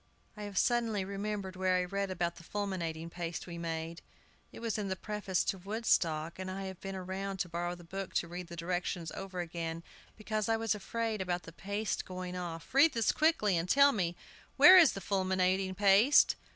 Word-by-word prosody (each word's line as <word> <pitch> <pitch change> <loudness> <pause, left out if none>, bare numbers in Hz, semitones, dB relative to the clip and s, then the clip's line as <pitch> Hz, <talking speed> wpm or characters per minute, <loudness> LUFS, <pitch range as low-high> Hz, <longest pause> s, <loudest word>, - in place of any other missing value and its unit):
"I 210 - -9
have 200 -2 -7
suddenly 230 -5 +1
remembered 200 -1 -4
where 185 0 +1
I 180 - +2
read 200 +2 -2
about 170 -2 -2
the 170 - -12
'fulminating 170 -5 -4
paste' 170 -1 -5
we 170 -1 -7
made. 165 0 -4 0.5
It - - -10
was 230 -2 -2
in 205 - -2
the 190 - -1
preface 205 -2 -2
to 195 - -2
'Woodstock,' 175 -6 0
and 185 0 -4
I 195 +1 -4
have 190 -2 -7
been 195 0 -5
round 190 +1 -4
to 180 - -3
borrow 175 +1 -3
the 175 - -14
book 195 +3 -6
to 170 - +1
read 175 +1 -7
the 170 - -8
directions 175 0 -3
over 190 -2 -5
again, 165 -1 -5 0.3
because 215 -1 -2
I 225 - +3
was 225 -2 0
afraid 220 +1 -3
about 180 -2 -2
the 165 - -11
'paste' 205 +4 -3
going 185 -1 -6
off. 170 0 -6
READ 290 +4 +6
THIS 230 -2 +2
QUICKLY! 305 - +2
and 170 +2 -2
tell 280 0 +6
me, 175 -7 -1 0.4
Where 370 - +10
is 350 -4 +8
the 195 - -6
fulminating 190 -1 0
paste?" 205 +7 +5
190 Hz, 200 wpm, -32 LUFS, 175-205 Hz, 0.5 s, Where